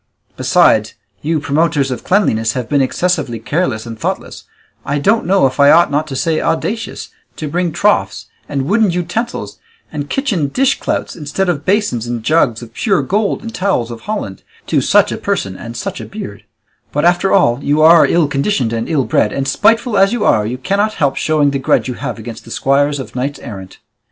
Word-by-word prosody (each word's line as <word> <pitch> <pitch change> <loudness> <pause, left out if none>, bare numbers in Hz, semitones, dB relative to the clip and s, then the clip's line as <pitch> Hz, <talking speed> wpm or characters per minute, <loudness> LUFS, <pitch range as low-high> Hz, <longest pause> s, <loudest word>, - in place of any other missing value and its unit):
Besides, 110 0 +3 0.3
you 160 +1 0
promoters 145 -2 0
of 125 - -5
cleanliness 115 - +1
have 125 -3 -3
been 145 -2 +2
excessively 150 -3 -1
careless 120 -2 -2
and 115 -1 -8
thoughtless, - - -4 0.4
I 140 +1 -1
don't 200 +7 +1
know 190 -4 +4
if 130 +2 -1
I 140 0 +7
ought 165 +2 +5
not 150 +2 0
to 135 - -6
say 160 +4 0
audacious, 225 +7 -2 0.3
to 155 - -5
bring 175 +3 -1
troughs 205 +6 +1 0.2
and 140 -2 -1
wooden 210 +7 +2
utensils 180 +7 -3 0.3
and 145 -2 -5
kitchen 215 - 0
dishclouts, 270 - -1
instead 165 +5 -2
of 145 -5 -2
basins 185 - 0
and 120 -2 -4
jugs 120 -4 +1
of 115 - -12
pure 195 - +1
gold 205 - -1
and 230 0 -7
towels 180 - -1
of 115 -1 -8
holland, 205 - -5 0.2
to - - +1
such - - +3
a - - -4
person 95 -1 -2
and 115 +4 -8
such - - -5
a - - -7
beard; 105 - -8 0.5
but, 150 +3 0
after 175 +2 +3
all, 140 -9 +3
you 150 +2 +2
are 165 +1 +7
ill 170 -3 +2
conditioned 140 - 0
and 115 0 -3
ill 145 -6 +1
bred, 105 - +1
and 135 0 -2
spiteful 225 - +2
as 195 +1 +4
you 235 -3 -1
are, 105 -1 +3
you 125 +3 -4
cannot 200 +8 0
help 140 -3 +1
showing 150 -2 +1
the 140 - -2
grudge 130 - +1
you 125 - -3
have - - -5
against 115 0 -8
the - - -14
squires 145 +4 +1
of 130 - -8
knights 135 +3 -2
errant." 95 -7 -9
145 Hz, 195 wpm, -16 LUFS, 125-185 Hz, 0.5 s, I